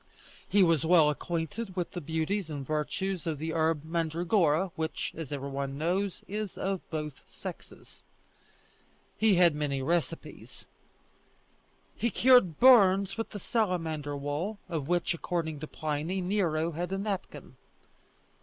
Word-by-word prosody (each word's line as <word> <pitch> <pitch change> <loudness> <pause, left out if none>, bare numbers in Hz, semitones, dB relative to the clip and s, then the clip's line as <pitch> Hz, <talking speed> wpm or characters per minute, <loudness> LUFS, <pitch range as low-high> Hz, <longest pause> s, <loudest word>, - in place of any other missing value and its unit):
He 200 -1 +5
was 165 -5 +3
well 160 -3 +5
acquainted 175 +7 -4
with 180 -2 -2
the 175 - -5
beauties 160 +4 -2
and 145 -3 -5
virtues 165 +5 -2
of 160 -2 -1
the 160 +2 -3
herb 160 -2 +1
mandragora, 165 +1 +1
which, 160 0 -3
as 160 -4 -6
every 140 -1 -4
one 135 0 -3
knows, 180 +5 -1
is 210 -1 -4
of 195 -1 -2
both 150 -3 -5
sexes. - - -10 1.1
He 215 -3 +4
had 175 -2 +5
many 145 -2 -1
recipes. 165 +2 -3 1.3
He 235 - 0
cured 240 - +5
burns 200 -6 +6
with 225 - -4
the 205 - -7
salamander 165 -9 -1
wool, 145 +9 -3
of 160 -6 -3
which, 175 0 +1
according 165 -3 -3
to 155 - -6
Pliny, 155 +5 -3
Nero 175 -4 0
had 175 +3 -4
a 195 - -1
napkin. 200 -1 -5
170 Hz, 135 wpm, -29 LUFS, 155-190 Hz, 1.3 s, burns